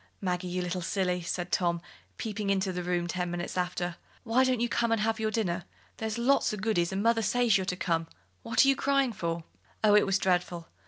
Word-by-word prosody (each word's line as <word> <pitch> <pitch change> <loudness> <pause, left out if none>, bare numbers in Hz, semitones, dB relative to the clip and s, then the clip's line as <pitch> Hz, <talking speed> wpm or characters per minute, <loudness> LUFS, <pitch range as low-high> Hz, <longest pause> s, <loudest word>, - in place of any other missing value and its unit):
"Maggie, 180 -1 -2
you 180 0 -2
little 180 +1 -2
silly," 180 0 0
said 175 +1 -3
Tom, 170 -2 +1 0.4
peeping 210 -2 -3
into 190 -1 +1
the 180 - -3
room 175 -1 -1
ten 180 0 -2
minutes 175 0 -4
after, 180 -1 -2 0.3
"why 245 +2 +3
don't 255 -2 +1
you 240 - +1
come 235 0 0
and 230 - +2
have 225 +1 0
your 220 0 0
dinner? 185 -6 -1 0.3
There's 220 0 -3
lots 255 +4 +3
o' 210 - -3
goodies, 195 -4 0
and 195 +1 -1
mother 230 0 +3
says 235 0 +3
you're 190 -1 +1
to 180 - 0
come. 165 -3 -1 0.3
What 230 +3 +3
are - - +2
you 275 - +5
crying 275 -3 +1
for?" 170 -3 -3 0.4
Oh, 210 -1 +6
it 210 - +5
was 195 0 +3
dreadful! 180 -3 -1
190 Hz, 220 wpm, -29 LUFS, 175-225 Hz, 0.4 s, Oh